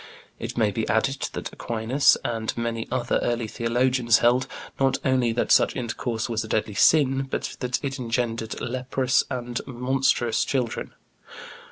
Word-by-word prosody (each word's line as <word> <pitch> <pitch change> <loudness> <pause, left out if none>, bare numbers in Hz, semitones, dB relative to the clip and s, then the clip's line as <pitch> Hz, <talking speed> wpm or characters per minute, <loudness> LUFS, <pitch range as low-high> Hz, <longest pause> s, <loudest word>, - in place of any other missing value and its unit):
It - - -6
may 110 -3 +2
be 110 +2 -3
added 135 +5 +1
that - - -5
Aquinas 125 +5 +2
and 115 -1 -2
many 115 -1 -2
other 125 -2 0
early 120 -1 -1
theologians 120 +1 +2
held, 125 +2 +3 0.3
not 135 -1 +2
only 130 -3 +2
that 120 - -1
such - - +4
intercourse 120 -2 -3
was 115 -2 -1
a - - -8
deadly 110 -1 -1
sin, 135 +3 +3
but - - -3
that 125 -1 -1
it 135 0 -3
engendered 115 -2 -2
leprous 130 +1 0
and 120 -1 -3
monstrous 125 -2 +1
children. 125 -4 -2
120 Hz, 150 wpm, -25 LUFS, 115-130 Hz, 0.3 s, such